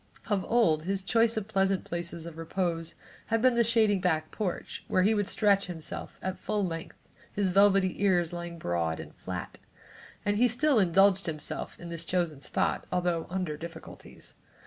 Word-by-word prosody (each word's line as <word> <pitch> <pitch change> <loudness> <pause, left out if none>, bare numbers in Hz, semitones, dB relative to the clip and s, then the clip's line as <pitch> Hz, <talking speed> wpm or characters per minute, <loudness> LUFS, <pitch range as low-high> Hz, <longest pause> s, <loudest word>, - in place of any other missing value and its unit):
Of 195 -2 +2
old, 165 -10 +3
his 195 0 -1
choice 225 +3 +3
of 210 -2 -2
pleasant 195 -3 +1
places 170 -1 -4
of 165 -1 -9
repose 165 -1 -2 0.3
had 225 0 +1
been 255 +2 +4
the 235 0 +3
shady 220 -3 +3
back 155 -4 0
porch, 195 -5 -4
where 185 - +2
he 215 +3 +4
would 205 -2 0
stretch 200 -3 +2
himself 165 -3 -6
at 185 0 -3
full 210 -2 -1
length, 165 -2 -6 0.3
his 200 -2 +1
velvety 195 0 +3
ears 175 -4 +2
lying 170 0 -5
broad 85 - -1
and - - -9
flat, - - -7 0.7
and 205 0 +1
he 245 +3 +5
still 250 +2 +3
indulged 195 +1 +4
himself 155 -2 -5
in 170 - -8
this 170 -1 -3
chosen 170 -6 -1
spot, - - -1
although 175 -2 0
under 180 -4 -2
difficulties. 165 +1 -10
185 Hz, 170 wpm, -29 LUFS, 170-205 Hz, 0.7 s, he